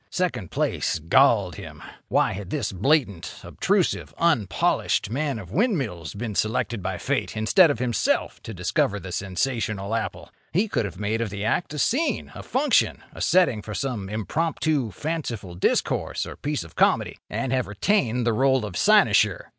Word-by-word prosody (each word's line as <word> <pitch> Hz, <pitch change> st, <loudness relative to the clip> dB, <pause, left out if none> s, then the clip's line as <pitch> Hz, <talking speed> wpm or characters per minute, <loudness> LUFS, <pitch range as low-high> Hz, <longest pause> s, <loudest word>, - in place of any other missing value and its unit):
Second 180 Hz, -, -2 dB
place -, -, 0 dB
galled 95 Hz, -, +3 dB
him. -, -, -10 dB, 0.2 s
Why -, -, +2 dB
had 95 Hz, -1 st, -6 dB
this 120 Hz, -5 st, -2 dB
blatant, 100 Hz, -, 0 dB
obtrusive, -, -, 0 dB
unpolished 140 Hz, -, +1 dB
man 140 Hz, 0 st, -1 dB
of 95 Hz, -5 st, -9 dB
windmills 135 Hz, -, -1 dB
been 110 Hz, +1 st, -4 dB
selected 110 Hz, +1 st, -1 dB
by -, -, -3 dB
Fate -, -, -2 dB
instead 160 Hz, -, +5 dB
of 145 Hz, -, 0 dB
himself 120 Hz, -2 st, 0 dB
to -, -, -8 dB
discover 100 Hz, +1 st, 0 dB
the 95 Hz, -2 st, -8 dB
sensational 100 Hz, +2 st, -2 dB
apple? 115 Hz, -, -3 dB, 0.2 s
He 195 Hz, +7 st, +2 dB
could 115 Hz, -, -1 dB
have 95 Hz, -1 st, -7 dB
made 105 Hz, +2 st, -1 dB
of 115 Hz, -, -1 dB
the 100 Hz, +1 st, -4 dB
act 150 Hz, +6 st, -1 dB
a -, -, -4 dB
scene, 260 Hz, -, 0 dB
a -, -, -8 dB
function, 265 Hz, 0 st, +1 dB
a -, -, -9 dB
setting 175 Hz, -12 st, +3 dB
for 105 Hz, 0 st, -7 dB
some 110 Hz, -6 st, -3 dB
impromptu, 145 Hz, -, -1 dB
fanciful 115 Hz, -, -4 dB
discourse 85 Hz, -, 0 dB
or -, -, -8 dB
piece 150 Hz, -, -3 dB
of 80 Hz, -, -14 dB
comedy—and 130 Hz, -2 st, 0 dB
have 130 Hz, -1 st, 0 dB
retained 120 Hz, -, +1 dB
the 115 Hz, -, +2 dB
role 130 Hz, 0 st, +2 dB
of 100 Hz, -4 st, -7 dB
cynosure. -, -, +4 dB
115 Hz, 160 wpm, -24 LUFS, 100-150 Hz, 0.2 s, instead